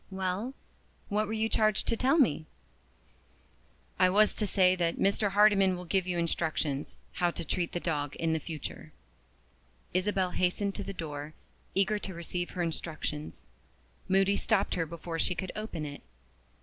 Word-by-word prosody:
"Well, 190 +6 -2 0.5
what 210 +1 +1
were 220 - -3
you 220 0 +1
charged 215 -2 +2
to 230 - +3
tell 260 +6 +3
me?" 160 - +3 1.5
"I 185 - +6
was 210 +3 +5
to 210 - 0
say 185 -1 +4
that 170 -2 0
Mr. 200 +1 +2
Hardyman 195 -2 +5
will 180 - -7
give 185 +2 0
you 180 -1 -1
instructions 155 -4 -1
how 175 -1 +1
to 170 -1 -5
treat 170 +2 -1
the 175 - -1
dog 145 -5 -2
for - - -1
the 160 0 +1
future." 155 -1 -7 1.0
Isabel 185 0 +1
hastened 185 +3 0
to 205 - -5
the 195 - -5
door, 150 -4 -6 0.4
eager 200 +2 +2
to 190 -3 -6
receive 175 +1 -3
her 175 - +1
instructions. 155 -2 -4 0.6
Moody 195 +1 +3
stopped 205 -3 +1
her 165 -3 -1
before 165 +1 -5
she 180 - +2
could 190 +1 -4
open 215 -8 -4
it. 145 -1 -7
185 Hz, 160 wpm, -30 LUFS, 165-200 Hz, 1.5 s, I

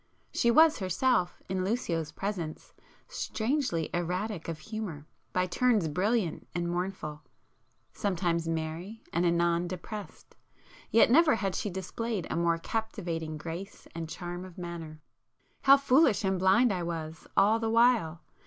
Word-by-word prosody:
She 235 - +2
was 315 +6 +6
herself, 190 +1 +1
in 185 0 -1
Lucio's 175 -7 -1
presence, 175 -4 -5 0.3
strangely 250 - -1
erratic 180 +2 -2
of 165 -2 -3
humour, 180 -4 -6 0.3
by 180 0 +1
turns 215 -1 +2
brilliant 185 +3 0
and 175 -1 -1
mournful,—sometimes 175 0 -4
merry 165 +6 -4
and 175 +1 +2
anon 170 0 +2
depressed: 195 +4 -8 0.5
yet 230 0 +5
never 310 +1 +6
had 195 -4 -1
she 205 - -2
displayed 190 +2 -3
a - - -1
more 170 0 +2
captivating 170 -6 -3
grace 170 +6 -7
and 165 -1 -5
charm 175 +1 -6
of 185 -2 -11
manner. 165 -3 -7 0.6
How 275 0 +8
foolish 275 -4 +4
and 190 -1 +1
blind 200 +5 +4
I 180 - -2
was 160 -2 -5
all 215 +3 +5
the 225 -1 -1
while! 230 -8 +3
185 Hz, 135 wpm, -29 LUFS, 170-220 Hz, 0.6 s, How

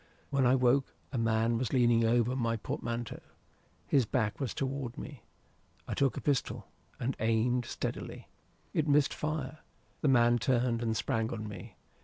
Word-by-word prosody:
When 135 -3 +3
I 125 - +5
woke, 130 +1 +2 0.2
a 135 - -2
man 115 0 +2
was 125 -3 -2
leaning 120 -3 +4
over 120 +2 +2
my 115 -3 0
portmanteau. 115 +1 -4 0.7
His 135 -6 +2
back 110 -4 0
was 135 -4 -2
toward 135 -1 -3
me. 145 -7 -8 0.7
I - - -2
took 135 -2 +1
a - - -3
pistol, 140 -3 -1 0.3
and 130 +3 -1
aimed 115 +3 +1
steadily. - - -5 0.5
It 155 -1 +1
missed 145 -1 +4
fire. 155 -1 -3 0.4
The - - +1
man 120 -2 +5
turned 120 -2 +1
and 110 -1 0
sprang 115 0 -1
on 110 -2 -4
me. 100 +1 -9
120 Hz, 160 wpm, -31 LUFS, 115-135 Hz, 0.7 s, I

